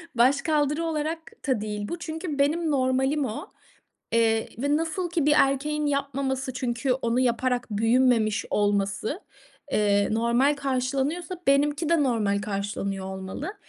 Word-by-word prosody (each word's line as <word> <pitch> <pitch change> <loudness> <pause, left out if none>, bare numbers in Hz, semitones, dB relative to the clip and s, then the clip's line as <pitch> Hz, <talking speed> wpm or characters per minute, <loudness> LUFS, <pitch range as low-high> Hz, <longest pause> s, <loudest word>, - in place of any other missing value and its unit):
başkaldırı 290 +5 +2
olarak 320 +1 -2 0.3
da 255 -6 +1
değil 210 -1 -4
bu. 345 - -5
Çünkü 320 -2 -5
benim 310 +3 +2
normalim 265 +2 +1
o, 220 - -6 0.6
eee, 225 -1 +2
ve 285 +3 +1
nasıl 330 +2 -2
ki 330 -5 0
bir 295 - +5
erkeğin 295 +2 +1
yapmaması 275 -1 -1
çünkü 250 0 -1
onu 245 -1 0
yaparak 245 0 +1
büyümemiş 225 0 +2
olması, 205 - 0 0.5
eee, 205 -1 +2
normal 235 +6 +2
karşılanıyorsa 275 +6 -1
benimki 290 +3 +2
de 335 -2 +3
normal 210 -5 +1
karşılanıyor 200 -1 -3
olmalı, 190 - -6
265 Hz, 125 wpm, -26 LUFS, 225-295 Hz, 0.6 s, bir